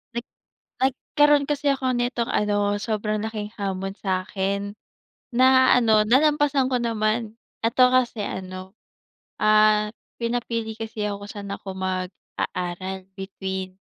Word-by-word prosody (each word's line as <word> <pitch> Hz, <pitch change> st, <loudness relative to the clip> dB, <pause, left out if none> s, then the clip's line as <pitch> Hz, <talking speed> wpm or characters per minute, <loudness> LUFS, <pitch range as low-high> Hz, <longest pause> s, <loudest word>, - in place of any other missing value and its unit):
Nag 235 Hz, -, -3 dB, 0.6 s
Nagkaroon 290 Hz, +2 st, +3 dB
kasi 290 Hz, 0 st, -1 dB
ako 260 Hz, -1 st, -1 dB
nitong 245 Hz, -1 st, -1 dB
ano, 205 Hz, 0 st, +1 dB
sobrang 215 Hz, -1 st, -1 dB
laking 215 Hz, -2 st, -5 dB
hamon 195 Hz, -1 st, -2 dB
sa'kin. 195 Hz, +1 st, -2 dB, 0.6 s
Na, 260 Hz, +1 st, +6 dB
ano 220 Hz, -3 st, +4 dB
nalampasan 285 Hz, +1 st, +3 dB
ko 250 Hz, -, +3 dB
naman, 220 Hz, -1 st, -1 dB, 0.3 s
eto 250 Hz, +2 st, +5 dB
kasi 245 Hz, -4 st, +2 dB
ano, 185 Hz, -1 st, -6 dB, 0.7 s
ah, 215 Hz, 0 st, +4 dB, 0.3 s
pinapili 230 Hz, -1 st, -2 dB
kasi 220 Hz, -1 st, -4 dB
ako 200 Hz, 0 st, -5 dB
sa'n 200 Hz, -1 st, -7 dB
ako 195 Hz, -1 st, -7 dB
mag-aaral 185 Hz, 0 st, -4 dB
between, 190 Hz, -1 st, -5 dB
215 Hz, 110 wpm, -24 LUFS, 195-245 Hz, 0.7 s, Na